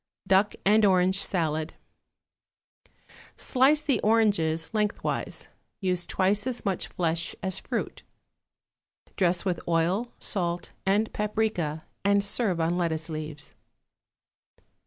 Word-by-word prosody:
=Duck 190 Hz, +2 st, +3 dB
and 215 Hz, +2 st, +5 dB
Orange 190 Hz, -1 st, +4 dB
Salad.= 160 Hz, -4 st, -1 dB, 1.6 s
Slice 285 Hz, +3 st, +3 dB
the 270 Hz, -7 st, +1 dB
oranges 200 Hz, -8 st, +2 dB
lengthwise; 210 Hz, -1 st, -2 dB, 0.3 s
use 180 Hz, -3 st, 0 dB
twice 200 Hz, +4 st, +1 dB
as 250 Hz, -3 st, -4 dB
much 195 Hz, -2 st, -1 dB
flesh 165 Hz, -1 st, -2 dB
as 190 Hz, -1 st, -2 dB
fruit. -, -, -4 dB, 1.1 s
Dress 180 Hz, -1 st, +1 dB
with 180 Hz, -3 st, -1 dB
oil, 175 Hz, +8 st, +1 dB
salt 175 Hz, -3 st, -1 dB
and 210 Hz, +3 st, +2 dB
paprica, 210 Hz, -8 st, -1 dB, 0.2 s
and 200 Hz, 0 st, +3 dB
serve 200 Hz, -4 st, 0 dB
on 170 Hz, +2 st, +1 dB
lettuce 160 Hz, -2 st, -1 dB
leaves. 155 Hz, -2 st, -6 dB
190 Hz, 105 wpm, -27 LUFS, 165-210 Hz, 1.6 s, and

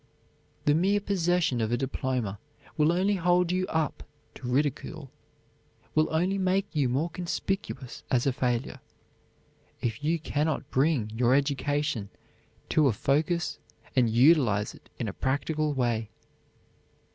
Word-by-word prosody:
The 145 Hz, -, +5 dB
mere 195 Hz, +6 st, +3 dB
possession 175 Hz, -, +1 dB
of 110 Hz, 0 st, 0 dB
a 120 Hz, -, +2 dB
diploma 125 Hz, -5 st, -2 dB, 0.4 s
will 155 Hz, +1 st, +3 dB
only 190 Hz, +3 st, +2 dB
hold 180 Hz, 0 st, +2 dB
you 185 Hz, 0 st, 0 dB
up 160 Hz, -2 st, -1 dB, 0.3 s
to 125 Hz, -, -8 dB
ridicule, 140 Hz, +2 st, -1 dB, 0.8 s
will 155 Hz, 0 st, +3 dB
only 180 Hz, +5 st, +1 dB
make 190 Hz, +1 st, +2 dB
you 145 Hz, -5 st, +1 dB
more 150 Hz, +7 st, 0 dB
conspicuous 180 Hz, -6 st, -4 dB
as 125 Hz, -2 st, +2 dB
a 135 Hz, -, +2 dB
failure, 125 Hz, 0 st, -1 dB, 1.0 s
if 115 Hz, +3 st, -3 dB
you 165 Hz, +3 st, +2 dB
cannot 150 Hz, -2 st, -2 dB
bring 130 Hz, -6 st, +1 dB
your 120 Hz, +3 st, +3 dB
education 140 Hz, -5 st, 0 dB, 0.6 s
to 155 Hz, -2 st, +4 dB
a 125 Hz, -, +3 dB
focus 150 Hz, -, 0 dB, 0.4 s
and 125 Hz, -3 st, +4 dB
utilize 120 Hz, -4 st, +4 dB
it -, -, -18 dB
in -, -, -3 dB
a -, -, -4 dB
practical 150 Hz, +3 st, -1 dB
way. 120 Hz, -5 st, 0 dB
145 Hz, 135 wpm, -28 LUFS, 125-170 Hz, 1.0 s, The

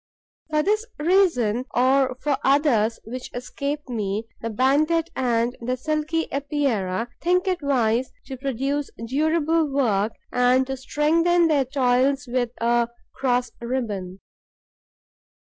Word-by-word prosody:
For 305 Hz, -1 st, +1 dB
this 425 Hz, +4 st, +1 dB
reason, 295 Hz, -, +2 dB
or 260 Hz, +1 st, +3 dB
for 290 Hz, -2 st, +2 dB
others 265 Hz, -6 st, +3 dB
which 250 Hz, +3 st, -7 dB
escape 280 Hz, +4 st, -4 dB
me, 215 Hz, -3 st, -2 dB, 0.2 s
the 230 Hz, -, -3 dB
Banded 305 Hz, +8 st, +2 dB
and 240 Hz, -1 st, 0 dB
the 250 Hz, +2 st, -2 dB
Silky 310 Hz, +4 st, -1 dB
Epeirae 265 Hz, -9 st, -1 dB, 0.2 s
think 360 Hz, +2 st, +2 dB
it 365 Hz, -2 st, 0 dB
wise 250 Hz, -3 st, +1 dB
to 265 Hz, -, -6 dB
produce 275 Hz, +2 st, -2 dB, 0.2 s
durable 315 Hz, +3 st, +1 dB
work 220 Hz, -6 st, +1 dB, 0.2 s
and 250 Hz, +1 st, +3 dB
to 265 Hz, 0 st, -3 dB
strengthen 330 Hz, +6 st, +2 dB
their 285 Hz, -4 st, +3 dB
toils 265 Hz, +1 st, +1 dB
with 245 Hz, -1 st, 0 dB
a 235 Hz, 0 st, +2 dB, 0.2 s
cross 250 Hz, -2 st, 0 dB
ribbon. 210 Hz, -7 st, -4 dB
265 Hz, 120 wpm, -23 LUFS, 240-300 Hz, 0.2 s, or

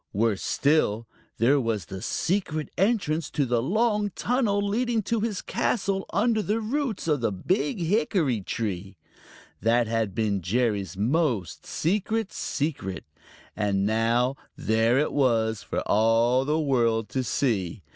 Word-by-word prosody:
Worse 105 Hz, -1 st, +1 dB
still, 115 Hz, -7 st, +1 dB, 0.3 s
there 135 Hz, +5 st, +4 dB
was 110 Hz, -6 st, -2 dB
the 95 Hz, +2 st, -7 dB
secret 160 Hz, -, -1 dB
entrance 180 Hz, -7 st, +1 dB
to 145 Hz, -, 0 dB
the 120 Hz, -2 st, +1 dB
long 210 Hz, -, +1 dB
tunnel 235 Hz, -5 st, +1 dB
leading 230 Hz, +1 st, 0 dB
to 225 Hz, +4 st, 0 dB
his 210 Hz, -3 st, -2 dB
castle 195 Hz, -2 st, -1 dB
under 220 Hz, +1 st, +2 dB
the 210 Hz, +2 st, 0 dB
roots 235 Hz, -, -2 dB
of 150 Hz, -5 st, +1 dB
the 115 Hz, -, +1 dB
Big 185 Hz, -, -1 dB
Hickory 165 Hz, -, +1 dB
tree. 95 Hz, -2 st, -4 dB, 0.6 s
That 120 Hz, +1 st, +3 dB
had 110 Hz, -3 st, -1 dB
been 105 Hz, -3 st, 0 dB
Jerry's 100 Hz, -1 st, -1 dB
most 120 Hz, -, 0 dB
secret 210 Hz, +5 st, -1 dB
secret, 135 Hz, -, -3 dB, 0.5 s
and 100 Hz, -2 st, 0 dB
now 115 Hz, +4 st, +1 dB, 0.2 s
there 110 Hz, +3 st, +2 dB
it 150 Hz, -, +1 dB
was 110 Hz, -6 st, +1 dB
for -, -, -3 dB
all 115 Hz, +4 st, +3 dB
the 150 Hz, +2 st, +1 dB
world 115 Hz, -7 st, +1 dB
to 130 Hz, -, -1 dB
see. 110 Hz, -7 st, -1 dB
130 Hz, 135 wpm, -26 LUFS, -, 0.6 s, there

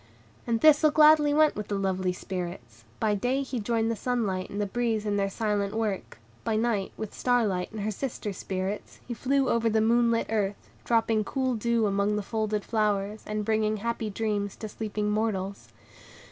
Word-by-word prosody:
And 230 Hz, -1 st, +1 dB
Thistle 310 Hz, +2 st, +6 dB
gladly 300 Hz, -1 st, +6 dB
went 305 Hz, +1 st, +4 dB
with 210 Hz, -, -5 dB
the 205 Hz, -, -2 dB
lovely 190 Hz, -1 st, 0 dB
Spirits; 175 Hz, -, -6 dB
by 215 Hz, -1 st, +2 dB
day 250 Hz, +7 st, 0 dB
he 260 Hz, -2 st, -4 dB
joined 225 Hz, +1 st, 0 dB
the -, -, -1 dB
sunlight 205 Hz, -5 st, -1 dB
and 205 Hz, -, -5 dB
the 205 Hz, -, +1 dB
breeze 220 Hz, +1 st, -1 dB
in 205 Hz, -1 st, 0 dB
their 200 Hz, -1 st, +1 dB
silent 205 Hz, -1 st, -1 dB
work; 215 Hz, -4 st, -2 dB, 0.3 s
by 225 Hz, -, 0 dB
night, 215 Hz, -3 st, 0 dB
with 220 Hz, -2 st, -5 dB
Star 245 Hz, -2 st, +2 dB
Light 180 Hz, -3 st, -2 dB
and 220 Hz, -1 st, -5 dB
her 215 Hz, +2 st, -1 dB
sister 215 Hz, -2 st, -4 dB
spirits, 190 Hz, +2 st, -4 dB
he 245 Hz, -, -3 dB
flew 270 Hz, +3 st, +1 dB
over 230 Hz, -1 st, +2 dB
the 220 Hz, 0 st, +2 dB
moon 235 Hz, +2 st, +3 dB
lit 230 Hz, 0 st, +1 dB
earth, 205 Hz, -2 st, -2 dB
dropping 225 Hz, -2 st, +2 dB
cool 260 Hz, +3 st, -1 dB
dew 235 Hz, 0 st, +1 dB
upon 200 Hz, +1 st, +1 dB
the 210 Hz, -, -2 dB
folded 215 Hz, -1 st, -1 dB
flowers, 210 Hz, -1 st, 0 dB
and 210 Hz, 0 st, -2 dB
bringing 215 Hz, 0 st, +1 dB
happy 230 Hz, 0 st, -2 dB
dreams 205 Hz, -1 st, -2 dB
to 220 Hz, -, -6 dB
sleeping 210 Hz, -1 st, -3 dB
mortals. 200 Hz, -3 st, -2 dB
215 Hz, 190 wpm, -27 LUFS, 200-235 Hz, 0.3 s, Thistle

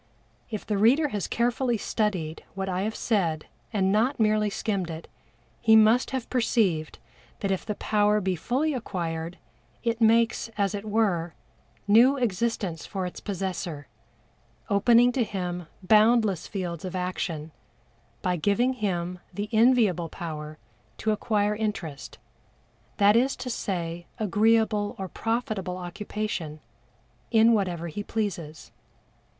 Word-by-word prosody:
If 215 Hz, -3 st, -5 dB
the 210 Hz, -2 st, -1 dB
reader 275 Hz, +8 st, +4 dB
has 205 Hz, -5 st, -3 dB
carefully 240 Hz, 0 st, 0 dB
studied 190 Hz, -7 st, -2 dB
what 195 Hz, 0 st, -3 dB
I 185 Hz, 0 st, -1 dB
have 215 Hz, +2 st, -2 dB
said 170 Hz, -9 st, 0 dB, 0.3 s
and 190 Hz, -3 st, +1 dB
not 235 Hz, +7 st, +2 dB
merely 215 Hz, -1 st, +3 dB
skimmed 200 Hz, -3 st, -2 dB
it, 160 Hz, 0 st, -7 dB, 0.5 s
he 220 Hz, -1 st, +5 dB
must 220 Hz, +3 st, +5 dB
have 260 Hz, -3 st, -3 dB
perceived 205 Hz, -10 st, +1 dB, 0.4 s
that 195 Hz, -, 0 dB
if 190 Hz, -, -1 dB
the 210 Hz, -, -3 dB
power 210 Hz, 0 st, +2 dB
be 190 Hz, -2 st, -1 dB
fully 265 Hz, -, 0 dB
acquired, 170 Hz, -8 st, -4 dB, 0.5 s
it 230 Hz, 0 st, -1 dB
makes, 230 Hz, +1 st, +3 dB
as 200 Hz, -1 st, +1 dB
it 205 Hz, 0 st, -5 dB
were, 185 Hz, -6 st, +1 dB, 0.5 s
new 240 Hz, +7 st, +6 dB
existence 210 Hz, -, -1 dB
for 190 Hz, -3 st, -4 dB
its 180 Hz, -, -6 dB
possessor, 180 Hz, -6 st, -4 dB, 0.9 s
opening 235 Hz, +4 st, +5 dB
to 245 Hz, -1 st, +1 dB
him 180 Hz, -5 st, -4 dB, 0.2 s
boundless 215 Hz, -2 st, +4 dB
fields 175 Hz, -5 st, -4 dB
of 185 Hz, 0 st, -5 dB
action 180 Hz, -4 st, -3 dB, 0.7 s
by 180 Hz, -1 st, +1 dB
giving 205 Hz, +9 st, +2 dB
him 180 Hz, -6 st, -2 dB
the 205 Hz, +1 st, -4 dB
enviable 220 Hz, -7 st, +3 dB
power 155 Hz, -2 st, -6 dB, 0.4 s
to 220 Hz, -, 0 dB
acquire 210 Hz, -1 st, +1 dB
interest 200 Hz, -10 st, -4 dB, 0.8 s
that 205 Hz, +1 st, +5 dB
is 260 Hz, +4 st, +3 dB
to 250 Hz, -, -5 dB
say 175 Hz, -5 st, -3 dB
agreeable 215 Hz, +1 st, +2 dB
or 190 Hz, -, -4 dB
profitable 215 Hz, -4 st, -2 dB
occupation 180 Hz, -3 st, -4 dB, 0.7 s
in 225 Hz, +1 st, +5 dB
whatever 180 Hz, -5 st, -1 dB
he 170 Hz, +5 st, -5 dB
pleases. 165 Hz, -, -4 dB
205 Hz, 130 wpm, -26 LUFS, 180-225 Hz, 0.9 s, new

